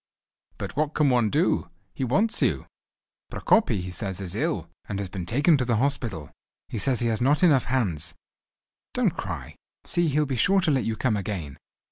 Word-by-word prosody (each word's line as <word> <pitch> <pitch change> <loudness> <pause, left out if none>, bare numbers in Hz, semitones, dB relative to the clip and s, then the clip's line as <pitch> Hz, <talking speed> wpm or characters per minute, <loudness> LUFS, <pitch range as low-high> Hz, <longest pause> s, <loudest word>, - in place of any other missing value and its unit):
"But - - -6
what 150 +1 0
can 150 -3 +3
one 120 -3 +3
do? - - +1 0.2
He - - -4
wants 200 - +1
you. - - +1 0.7
Prokopy, 120 - +2
he 90 - -5
says, 95 0 -3
is 95 -3 -3
ill, - - -1 0.2
and 100 - -2
has 100 -2 -4
been 90 -2 -6
taken 145 - +4
to 130 - 0
the 120 -1 +1
hospital. 115 - -2 0.4
He 110 - -4
says 130 +2 +2
he 120 - +1
has 110 +1 -1
not 145 +7 +3
enough 145 -8 +5
hands. 85 - -1 0.8
Don't - - +2
cry! - - -6 0.3
See, 175 -1 +1
he'll 150 +1 +2
be 135 -2 -2
sure 195 +10 +4
to 165 - +2
let 135 -3 +1
you 115 - -1
come 110 0 0
again. 95 -9 -4
120 Hz, 190 wpm, -26 LUFS, 100-145 Hz, 0.8 s, enough